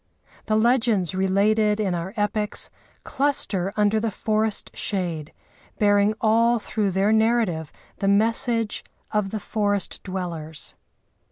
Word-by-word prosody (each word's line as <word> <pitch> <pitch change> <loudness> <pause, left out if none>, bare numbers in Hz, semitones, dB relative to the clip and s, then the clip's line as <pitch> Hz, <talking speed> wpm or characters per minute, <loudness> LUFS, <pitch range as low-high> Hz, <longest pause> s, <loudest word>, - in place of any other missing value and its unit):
The 215 - +2
legends 225 -5 +2
related 205 +3 +2
in 195 -4 0
our 175 +2 -3
epics 210 0 0 0.3
cluster 210 -10 0
under 210 +1 +3
the 225 +1 -1
forest 215 +1 -1
shade 170 -6 -2 0.5
bearing 205 0 +3
all 230 +2 +3
through 215 -2 -1
their 195 +3 +1
narrative 220 -8 +1 0.3
the 195 - -1
message 225 +2 +1 0.3
of 210 -2 0
the 215 - -3
forest 205 -2 -2
dwellers. 165 -6 -5
210 Hz, 115 wpm, -24 LUFS, 190-220 Hz, 0.5 s, under